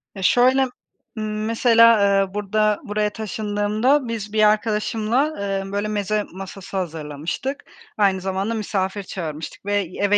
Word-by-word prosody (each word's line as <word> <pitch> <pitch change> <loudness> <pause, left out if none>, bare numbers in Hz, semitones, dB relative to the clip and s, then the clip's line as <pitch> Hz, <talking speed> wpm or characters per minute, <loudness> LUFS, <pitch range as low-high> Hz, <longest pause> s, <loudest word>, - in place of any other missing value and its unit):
Ya, 195 - -7
şöyle, 255 +5 +5 0.6
ımm, 215 0 -3
mesela, 230 -1 +5 0.2
eee, 195 0 -3
burada, 210 +1 +1
buraya 210 0 0
taşındığımda 215 +5 0
biz 215 -2 -5
bir 215 -1 +3
arkadaşımla, 220 +6 +1
eee, 195 -1 -2
böyle 205 +1 -1
meze 210 0 -1
masası 195 0 -7
hazırlamıştık, 165 - -4 0.3
aynı 195 -3 +2
zamanda 195 +3 -2
misafir 200 -2 -2
çağırmıştık 160 -3 -6
ve 205 0 +1 0.2
eve 205 0 +3
210 Hz, 130 wpm, -22 LUFS, 195-220 Hz, 0.6 s, şöyle